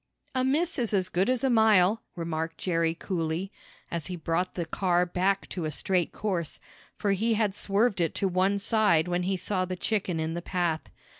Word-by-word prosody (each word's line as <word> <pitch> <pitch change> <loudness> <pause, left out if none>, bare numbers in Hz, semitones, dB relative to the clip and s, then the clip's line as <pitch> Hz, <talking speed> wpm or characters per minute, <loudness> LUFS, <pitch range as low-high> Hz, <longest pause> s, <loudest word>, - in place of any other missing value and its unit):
"A 255 -1 +1
miss 295 +5 +1
is 230 -4 0
as 185 -1 0
good 185 +6 +1
as 255 -1 +1
a 265 - +3
mile," 220 -2 +4
remarked 165 -1 -3
Jerry 165 -2 0
coolly, 170 +1 -3 0.4
as 170 -3 -3
he 185 - -4
brought 170 +2 -1
the 170 - -2
car 175 +1 +1
back 185 +2 0
to 175 -4 -4
a - - -1
straight 180 +3 0
course, 185 -7 -3 0.4
for 205 - 0
he 220 +4 +1
had 210 -2 +1
swerved 200 0 +1
it 165 - 0
to 195 - +1
one 190 +2 +2
side 200 -6 +3
when 175 0 0
he 190 +1 0
saw 185 +1 -1
the 185 0 -3
chicken 185 -3 -1
in 160 0 -2
the 170 - -3
path. 175 -3 -1
185 Hz, 200 wpm, -28 LUFS, 170-205 Hz, 0.4 s, mile